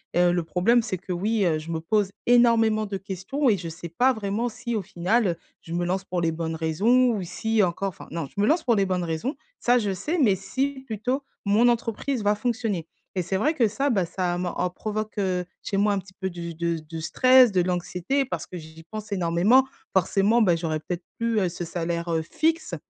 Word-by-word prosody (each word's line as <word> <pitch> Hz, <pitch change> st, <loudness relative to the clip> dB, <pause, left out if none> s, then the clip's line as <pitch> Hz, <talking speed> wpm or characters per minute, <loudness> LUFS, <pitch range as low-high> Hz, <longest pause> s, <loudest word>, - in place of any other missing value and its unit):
Heu, 175 Hz, 0 st, +4 dB
le 175 Hz, -1 st, 0 dB
problème, 210 Hz, +9 st, +2 dB
c'est 205 Hz, -5 st, -3 dB
que, 185 Hz, -, -8 dB
oui, 205 Hz, +4 st, 0 dB
heu, 160 Hz, -2 st, +2 dB
je 160 Hz, +2 st, -7 dB
me 160 Hz, -, -1 dB
pose 200 Hz, +4 st, 0 dB, 0.2 s
énormément 230 Hz, -3 st, +4 dB
de 200 Hz, -1 st, -4 dB
questions 195 Hz, +9 st, -1 dB
et 205 Hz, -, +3 dB
je 170 Hz, -, -6 dB
sais 170 Hz, +1 st, -8 dB
pas 250 Hz, +11 st, +3 dB
vraiment 220 Hz, +2 st, -2 dB
si 235 Hz, 0 st, -4 dB
au 210 Hz, -, -1 dB
final, 185 Hz, +2 st, +1 dB, 0.3 s
je 165 Hz, -, -8 dB
me 175 Hz, +1 st, 0 dB
lance 185 Hz, +2 st, -1 dB
pour 180 Hz, -1 st, -2 dB
les 165 Hz, -1 st, +1 dB
bonnes 160 Hz, 0 st, -3 dB
raisons 205 Hz, +11 st, +3 dB
ou 195 Hz, -, -3 dB
si 215 Hz, +4 st, 0 dB
encore 185 Hz, +2 st, -1 dB
enfin, 180 Hz, -, -12 dB
non 165 Hz, -4 st, -3 dB
je 200 Hz, -, -10 dB
me 205 Hz, -, +4 dB
lance 320 Hz, +7 st, +2 dB
pour 235 Hz, -3 st, +3 dB
les 195 Hz, -, +2 dB
bonnes 185 Hz, -1 st, -1 dB
raisons 165 Hz, -, -2 dB, 0.2 s
ça, 245 Hz, +1 st, +3 dB
je 205 Hz, -4 st, -1 dB
sais, 300 Hz, -, -2 dB
mais 220 Hz, -9 st, +4 dB
si, 265 Hz, +9 st, -2 dB
plutôt, 245 Hz, +4 st, -2 dB, 0.2 s
mon 210 Hz, +4 st, +4 dB
entreprise 235 Hz, +1 st, -1 dB
va 205 Hz, 0 st, +3 dB
fonctionner, 220 Hz, -6 st, -2 dB, 0.3 s
et 185 Hz, -, +1 dB
c'est 190 Hz, +2 st, -1 dB
vrai 295 Hz, +11 st, +2 dB
que 245 Hz, -8 st, +3 dB
ça, 275 Hz, +7 st, 0 dB
bah, 195 Hz, -8 st, +2 dB
ça 175 Hz, 0 st, -2 dB
me 180 Hz, 0 st, -2 dB
en 180 Hz, -, -1 dB
provoque, 215 Hz, +4 st, -4 dB
heu, 185 Hz, -3 st, 0 dB, 0.2 s
chez 195 Hz, -, -2 dB
moi 205 Hz, 0 st, +3 dB
un 200 Hz, -, 0 dB
petit 190 Hz, 0 st, -14 dB
peu 190 Hz, -, -2 dB
du 170 Hz, -2 st, -7 dB
de 170 Hz, 0 st, -1 dB
de 160 Hz, +1 st, -8 dB
stress, 255 Hz, +8 st, +5 dB
de 185 Hz, -, +3 dB
l'anxiété 180 Hz, +9 st, -1 dB
parce 260 Hz, -, -5 dB
que 180 Hz, -, -7 dB
j'y 160 Hz, 0 st, -11 dB
pense 215 Hz, -1 st, -7 dB
énormément. 190 Hz, +8 st, +4 dB, 0.3 s
Forcément, 195 Hz, +5 st, +3 dB
bah, 180 Hz, -6 st, +4 dB
j'aurais 160 Hz, -2 st, -2 dB
peut-être 175 Hz, +3 st, -5 dB
plus, 230 Hz, -1 st, 0 dB
heu, 185 Hz, -3 st, +1 dB
ce 175 Hz, +1 st, -6 dB
salaire, 170 Hz, 0 st, -3 dB
heu, 160 Hz, -, +1 dB
fixe 320 Hz, -, -1 dB
195 Hz, 230 wpm, -25 LUFS, 175-230 Hz, 0.3 s, stress